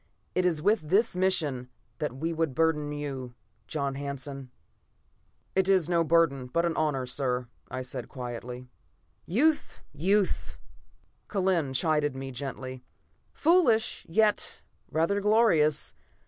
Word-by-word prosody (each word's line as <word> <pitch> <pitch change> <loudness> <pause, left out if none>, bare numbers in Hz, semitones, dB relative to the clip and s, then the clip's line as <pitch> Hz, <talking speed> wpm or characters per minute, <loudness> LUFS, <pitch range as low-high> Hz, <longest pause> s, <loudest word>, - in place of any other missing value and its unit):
It 185 0 +2
is 160 -4 -1
with 200 -6 +2
this 210 +2 +3
mission 155 -9 +1 0.3
that 145 -4 -2
we 165 +4 -2
would 160 -5 -1
burden 155 -2 +1
you, 135 -4 -5 0.3
John 140 -3 -2
Hanson." 140 -1 -6 1.1
"It 190 0 +3
is 185 -4 +3
no 170 -1 +4
burden, 155 -6 +2
but 170 +7 +1
an 170 - 0
honor, 145 -5 0
sir," 125 -1 -1 0.2
I 130 0 -4
said 125 -1 -6
quietly. 125 -1 -6 0.6
"Youth! 295 - +1
Youth!" 190 +6 0 0.7
Kellen 185 -8 +1
chided 150 -2 +1
me 135 0 -5
gently. 130 0 -6 0.5
"Foolish, 305 -10 +3
yet 210 +4 +1 0.3
rather 165 +6 +1
glorious. 205 -9 +3
150 Hz, 120 wpm, -28 LUFS, 135-185 Hz, 1.1 s, no